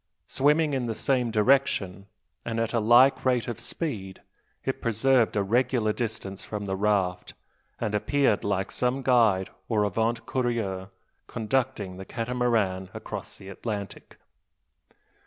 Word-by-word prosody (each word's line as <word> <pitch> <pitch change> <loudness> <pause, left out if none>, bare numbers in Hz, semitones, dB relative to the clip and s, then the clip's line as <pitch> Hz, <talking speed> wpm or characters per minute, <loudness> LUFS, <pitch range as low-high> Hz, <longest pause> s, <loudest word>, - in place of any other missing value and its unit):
Swimming 150 +2 +2
in 130 -3 -1
the 115 - -2
same 125 +1 +1
direction, 105 -5 +1 0.4
and 115 -1 -3
at 115 +1 -1
a 115 - +2
like 120 +5 +5
rate 125 -4 +1
of 120 -1 -4
speed, 115 - -4 0.5
it - - -2
preserved 115 +1 +2
a 100 - +2
regular 115 +1 +1
distance 110 -5 -4
from 105 -1 -5
the 95 -1 -2
raft; 95 -3 0 0.4
and 110 -3 -2
appeared 110 +1 +2
like 95 -2 -1
some 125 +2 -1
guide 110 -7 +3 0.2
or 110 -3 +2
avant 115 +4 0
courier 110 -7 -2 0.4
conducting 115 -5 -2
the 95 - -8
Catamaran 115 -6 -1
across - - -7
the 95 - -11
Atlantic! 100 0 -6
115 Hz, 135 wpm, -27 LUFS, 100-125 Hz, 0.5 s, like